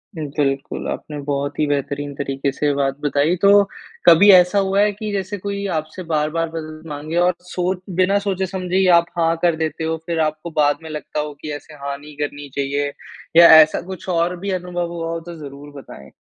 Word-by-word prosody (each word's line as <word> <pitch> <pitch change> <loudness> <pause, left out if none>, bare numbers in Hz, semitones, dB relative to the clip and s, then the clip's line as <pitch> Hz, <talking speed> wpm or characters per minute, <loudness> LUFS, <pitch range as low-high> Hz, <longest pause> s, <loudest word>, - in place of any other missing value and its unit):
बिल्कुल, 145 -2 -2
आपने 150 - -5
बहुत 140 0 -3
ही 150 - +3
बेहतरीन 145 0 -2
तरीके 140 0 -2
से 145 +1 0
बात 135 -1 -1
बताई। 145 +3 +1
तो, 200 0 +6 0.4
कभी 175 +4 +7
ऐसा 180 +2 +6
हुआ 195 0 +1
है 210 - +3
कि 210 +1 -6
जैसे 200 0 -3
कोई 200 +1 -4
आपसे 155 +4 -6
बार-बार 155 +2 0
मदद 155 -1 -7
माँगे 150 +3 -5
और 175 +1 +3
सोच 180 +1 -2
बिना 185 +2 +3
सोचे 195 -2 -1
समझे 185 -1 -4
ही 190 0 +3
आप 170 - +2
हाँ 165 0 +2
कर 170 -2 +3
देते 160 0 -3
हो, 160 0 -1
फिर 170 -2 -2
आपको 155 +1 -2
बाद 145 0 +3
में 160 - -8
लगता 150 0 -5
हो 150 0 -3
कि, 155 - -5
ऐसे 145 +2 -9
हाँ 140 -1 -5
नहीं 145 +1 -13
करनी 145 -1 -5
चाहिए? 140 +1 -1 0.5
या 170 - +10
ऐसा 155 +2 +2
कुछ 190 -1 -8
और 170 +1 +1
भी 200 +2 -3
अनुभव 175 -2 -3
हुआ 165 -1 -4
हो, 165 - -3
तो 170 +1 -10
ज़रूर 145 0 -10
बताएँ? 70 - -13
160 Hz, 205 wpm, -20 LUFS, 145-180 Hz, 0.5 s, या